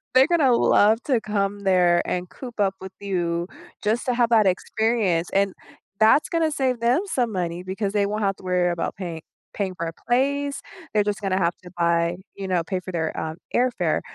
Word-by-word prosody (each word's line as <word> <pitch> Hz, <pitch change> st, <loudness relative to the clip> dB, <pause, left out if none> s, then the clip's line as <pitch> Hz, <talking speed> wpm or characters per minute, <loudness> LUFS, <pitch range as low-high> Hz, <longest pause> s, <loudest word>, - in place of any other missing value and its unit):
they're 260 Hz, -, +8 dB
gonna 305 Hz, -8 st, +4 dB
love 220 Hz, 0 st, +4 dB
to 250 Hz, -6 st, +1 dB
come 205 Hz, -1 st, -1 dB
there 180 Hz, -3 st, +4 dB
and 180 Hz, 0 st, -2 dB
coop 245 Hz, -4 st, -10 dB
up 195 Hz, -2 st, +2 dB
with 190 Hz, 0 st, -8 dB
you 175 Hz, -3 st, -1 dB, 0.4 s
just 220 Hz, +3 st, 0 dB
to 250 Hz, -, +2 dB
have 235 Hz, -1 st, +2 dB
that 215 Hz, -3 st, +5 dB
experience, 190 Hz, -2 st, 0 dB
and 195 Hz, -1 st, +2 dB, 0.5 s
that's 220 Hz, +7 st, +5 dB
gonna 330 Hz, -2 st, +1 dB
save 260 Hz, -4 st, 0 dB
them 245 Hz, +8 st, +3 dB
some 250 Hz, -, -1 dB
money, 175 Hz, -2 st, -3 dB
because 195 Hz, +2 st, -3 dB
they 205 Hz, -1 st, +2 dB
won't 210 Hz, +1 st, -2 dB
have 195 Hz, -1 st, 0 dB
to -, -, -16 dB
worry 180 Hz, -1 st, +1 dB
about 170 Hz, -, -3 dB
pay 175 Hz, -4 st, -6 dB, 0.3 s
paying 190 Hz, -3 st, -3 dB
for 170 Hz, -, -3 dB
a 165 Hz, -, -5 dB
place. 280 Hz, +3 st, +1 dB, 0.3 s
They're 210 Hz, -1 st, +3 dB
just 210 Hz, 0 st, -2 dB
gonna 190 Hz, -1 st, 0 dB
have 170 Hz, -1 st, +1 dB
to 180 Hz, -, -10 dB
buy 170 Hz, 0 st, +2 dB, 0.2 s
you 195 Hz, -1 st, -5 dB
know, 180 Hz, -2 st, +1 dB
pay 185 Hz, +3 st, -2 dB
for 185 Hz, -, -7 dB
their, 160 Hz, -2 st, -2 dB
um, 160 Hz, +1 st, -4 dB, 0.2 s
airfare. 240 Hz, -10 st, +1 dB
200 Hz, 205 wpm, -24 LUFS, 180-235 Hz, 0.5 s, they're